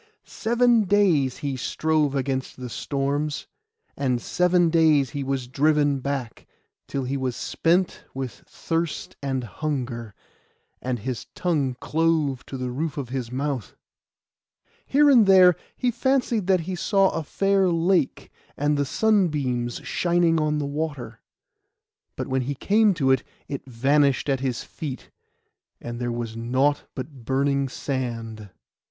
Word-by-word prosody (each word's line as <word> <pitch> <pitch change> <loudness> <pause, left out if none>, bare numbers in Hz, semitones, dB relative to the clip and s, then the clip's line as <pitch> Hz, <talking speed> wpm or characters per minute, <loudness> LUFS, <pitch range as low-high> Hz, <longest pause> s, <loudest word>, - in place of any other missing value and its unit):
Seven 235 -1 +2
days 180 -10 +3
he 140 -2 -1
strove 150 +2 0
against 135 -1 -2
the 125 -2 -7
storms, 145 +3 -2 0.5
and 130 -3 0
seven 180 +4 +2
days 155 -5 +4
he 140 -1 -3
was 135 -2 -2
driven 145 +1 +2
back, 135 -3 -4 0.4
till 135 - -3
he 130 +2 -2
was 130 -3 -2
spent 175 +2 0
with 130 -4 -6
thirst 165 -1 -3
and 135 -2 -2
hunger, 120 -3 -4 0.7
and 125 -1 -2
his 120 +1 -5
tongue 145 -8 0
clove 155 -4 +1
to 135 - -6
the 125 -1 -3
roof 150 +4 -3
of 135 -4 -4
his 125 -2 -4
mouth. 135 -4 -3 1.1
Here 290 +2 +4
and 245 -7 +6
there 185 -2 +7 0.2
he 250 -1 +1
fancied 245 -5 0
that 185 -2 +3
he 185 +3 -5
saw 195 +2 +2
a 165 - -2
fair 195 +4 +2
lake, 170 -3 +1 0.3
and 145 +1 +1
the 145 - +2
sunbeams 145 - +1
shining 170 -2 +2
on 150 0 +1
the 150 - -1
water; 140 -6 -4 0.9
but - - -3
when 130 0 0
he 140 +3 -3
came 210 +6 +3
to 135 -5 +2
it 130 -1 +3 0.3
it 140 -1 -6
vanished 140 +3 +2
at 135 -1 +1
his 130 -3 -2
feet, 140 -5 -7 0.7
and 120 0 -6
there 120 -1 -2
was 120 -1 -4
nought 130 +5 +1
but 130 -1 -7
burning 140 +2 +1
sand. 115 -6 -4
140 Hz, 140 wpm, -24 LUFS, 130-165 Hz, 1.1 s, there